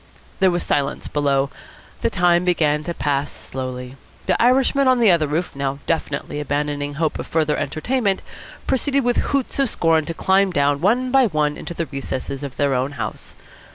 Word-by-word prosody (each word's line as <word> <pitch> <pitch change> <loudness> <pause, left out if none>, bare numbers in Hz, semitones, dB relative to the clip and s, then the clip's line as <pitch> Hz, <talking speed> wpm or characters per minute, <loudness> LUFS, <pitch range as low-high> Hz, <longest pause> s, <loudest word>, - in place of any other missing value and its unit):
There 190 -1 +5
was 175 -1 0
silence 140 -1 -1
below. 140 -2 +1 0.5
The - - +2
time 175 -1 +3
began 155 -4 +1
to 170 - -2
pass 145 -1 -1
slowly. 130 0 -6 0.3
The - - +1
Irishmen 265 +3 +3
on 255 -1 +4
the 225 -5 +6
other 160 -3 +2
roof, 160 +3 -2
now 140 0 -2
definitely 150 -2 -2
abandoning 145 0 -2
hope 155 +1 -1
of - - -5
further 155 -2 +1
entertainment, 200 +3 -1 0.4
proceeded 275 +1 +1
with 245 0 +1
hoots 275 -1 -1
of 270 -3 +3
scorn 165 -4 +2
to 165 - -5
climb 195 +2 +3
down 145 -4 +1
one 245 +7 +2
by 265 -2 +5
one 150 -5 0
into 170 - -7
the 165 - -2
recesses 135 -1 -5
of 140 -3 -6
their 140 -1 +2
own 130 +3 -1
house. 110 -5 -6
155 Hz, 180 wpm, -21 LUFS, 140-195 Hz, 0.5 s, the